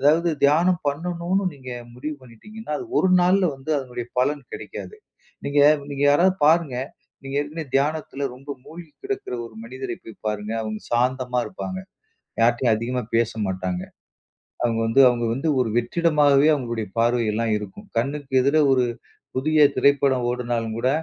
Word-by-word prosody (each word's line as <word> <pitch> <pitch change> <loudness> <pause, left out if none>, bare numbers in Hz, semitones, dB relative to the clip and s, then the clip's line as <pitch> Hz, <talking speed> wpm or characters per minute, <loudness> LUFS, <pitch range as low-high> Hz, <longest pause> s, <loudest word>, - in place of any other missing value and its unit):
அதாவது 160 +5 +4 0.2
தியானம் 165 +5 +4
பண்ணணும்ன்னு 175 +5 -1
நீங்க 130 -2 -10 0.2
முடிவு 150 +5 -5
பண்ணிடீங்கன்னா, 215 - -10
அது 370 - -7
ஒரு 190 - +3
நாள்ல 185 +2 +4
வந்து 135 +3 -7
அதனுடைய 125 -3 -6 0.2
பலன் 145 +2 0
கிடைக்காது. - - -8 0.5
நீங்க 145 +1 +2 0.3
நீங்க 140 0 -3
யாரது 180 +6 +4
பாருங்க, 160 -5 +3 0.5
நீங்க 135 - -6
ஏற்கனவே 155 +2 -5
தியானத்துல 140 -1 -1
ரொம்ப 135 +3 -11
முழ்கி 165 0 -11
கிடக்கிற 400 - -3
ஒரு 115 - -15
மனிதரைப் 125 0 -6
போய்ப் 110 -1 -13
பாருங்க. 105 0 -3
அவுங்க 110 -1 -4
சாந்தமா 125 +1 +1
இருப்பாங்க. 185 0 -6 0.6
யார்ட்டயும் 120 0 +3
அதிகமா 125 +3 -2
பேச 115 0 +2 0.2
மாட்டாங்க. 95 -1 -2 0.8
அவுங்க 115 -1 +1
வந்து, 115 +5 +3
அவங்க 120 -1 0
வந்து 135 +6 -2
ஒரு 125 - +1
வெற்றிடமாகவே 145 +2 +3
அவுங்களுடையப் 115 -6 -4
பார்வை 120 0 +2
எல்லாம் 115 +1 0
இருக்கும். 105 -2 -10
கண்ணுக்கு 135 +3 -2
எதிர 140 +4 +2
ஒரு, 130 -2 +4 0.5
புதிய 150 +2 +5
திரைப்படம் 140 -3 +3
ஓடுனாலும் 120 -2 -2
கூட, 125 +2 +1
135 Hz, 145 wpm, -23 LUFS, 120-155 Hz, 0.8 s, புதிய